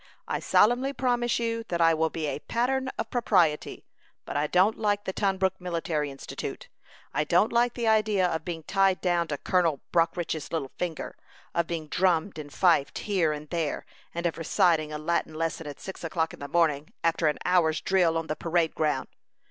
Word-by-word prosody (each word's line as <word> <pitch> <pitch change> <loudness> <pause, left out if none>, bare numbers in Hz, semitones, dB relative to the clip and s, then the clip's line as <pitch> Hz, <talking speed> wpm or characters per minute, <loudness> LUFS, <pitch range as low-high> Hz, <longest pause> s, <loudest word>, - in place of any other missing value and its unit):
I - - -1
solemnly 245 +6 +3
promise 245 -3 +1
you 230 -1 -1
that 170 - -2
I 165 -1 +5
will 160 0 +1
be 160 -1 -4
a 145 - -2
pattern 260 +7 -1
of - - -4
propriety; 180 -11 +1 0.4
but - - -6
I 145 +1 +1
don't 185 +7 +3
like 205 -2 +1
the 190 - -4
Tunbrook 190 -2 0
Military 165 -4 -2
Institute. 135 0 -7 0.4
I 150 - +1
don't 175 +9 +2
like 240 0 +2
the 235 -2 -1
idea 215 -3 +3
of 160 -3 -1
being 165 -2 -5
tied 195 0 +2
down 175 -2 +1
to 145 - -3
Colonel 170 -3 +1
Brockridge's 165 -2 0
little 140 -5 -3
finger; 170 -3 -4 0.4
of 170 -1 0
being 165 -2 -4
drummed 175 +1 +1
and 145 -1 -8
fifed 165 -6 +2
here 185 -7 +2
and 150 0 -6
there; 165 -4 -2 0.3
and 170 +1 -4
of 165 -1 -1
reciting 160 -1 +2
a 150 - -3
Latin 160 0 -1
lesson 165 -1 -2
at 145 - -8
six 190 - -8
o'clock 165 -1 -1
in - - -11
the 140 - -6
morning, 155 -3 +1
after 165 -1 +2
an 150 - +1
hour's 170 -3 +3
drill 175 -4 +2
on 165 - -2
the 155 - -3
parade 165 0 0
ground. 150 -4 0
170 Hz, 190 wpm, -27 LUFS, 155-195 Hz, 0.4 s, I